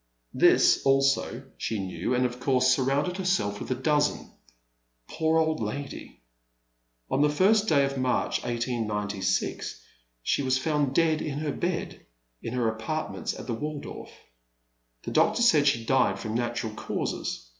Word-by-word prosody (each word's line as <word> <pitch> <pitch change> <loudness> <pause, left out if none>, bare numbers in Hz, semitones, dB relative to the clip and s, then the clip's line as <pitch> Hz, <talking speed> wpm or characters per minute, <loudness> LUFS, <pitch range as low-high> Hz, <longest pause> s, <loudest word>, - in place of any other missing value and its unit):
This - - +5
also 135 0 +2 0.2
she 110 - -2
knew 95 +4 -2
and 125 +1 +2
of 125 0 -3
course 130 -1 +2
surrounded 140 +7 0
herself 180 - 0
with - - -6
a 130 - 0
dozen. 145 +3 0 0.8
Poor 160 0 +1
old 160 -1 +1
lady! 115 - -6 0.9
On 135 - +2
the 150 - +5
ist 205 +8 +3
day 140 -6 +4
of 135 -1 -3
March, 130 -1 0
1896, 105 - -2 0.4
she 140 - +1
was 130 -1 +1
found 145 -1 0
dead 160 -2 +3
in 145 -2 -3
her 150 -1 -2
bed 175 +2 -3 0.4
in 115 - -5
her 120 -2 +1
apartments 110 +8 -3
at - - -8
the 120 - -3
Waldorf. 150 +5 -6 0.9
The - - -5
doctor 240 - +3
said 150 -11 +5
she 115 -4 +2
died 130 +2 +2
from 110 -1 -4
natural 120 -2 -2
causes. 85 - -4
135 Hz, 145 wpm, -27 LUFS, 115-150 Hz, 0.9 s, This